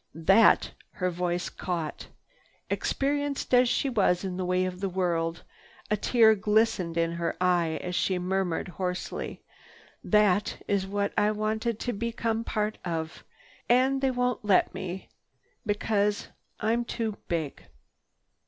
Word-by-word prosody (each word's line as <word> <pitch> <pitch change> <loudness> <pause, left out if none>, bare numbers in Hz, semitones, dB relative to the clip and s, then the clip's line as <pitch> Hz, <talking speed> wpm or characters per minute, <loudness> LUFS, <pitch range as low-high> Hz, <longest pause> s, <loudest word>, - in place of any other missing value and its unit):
"That—" 195 +7 +5 0.2
her 180 -2 -1
voice 175 0 -1
caught. 170 -4 -4 0.6
Experienced 285 -1 -1
as 250 0 +6
she 275 - +1
was 200 -8 +2
in 185 -2 -3
the 185 0 -2
ways 180 +1 +1
of 180 - -13
the 195 0 -1
world, 170 -3 -1 0.5
a - - +4
tear 220 +1 +5
glistened 210 -5 +1
in 165 0 +1
her 170 0 -2
eye 175 -3 +2
as 180 - -4
she 185 +1 +1
murmured 180 -1 -1
hoarsely, 180 0 -4 0.6
"That 210 -2 +2
is 195 -1 0
what 200 0 -1
I 210 - +3
wanted 215 +1 -1
to 245 - -2
become 230 +1 -2
a - - -4
part 215 0 -2
of. 165 -2 -4 0.5
And 260 +2 +3
they 270 - +3
won't 250 -3 -1
let 200 -3 +3
me 185 0 -6 0.6
be—because 205 0 0 0.3
I'm 230 +3 +1
too 225 -3 -3
big." 160 -5 -3
200 Hz, 140 wpm, -28 LUFS, 180-225 Hz, 0.6 s, as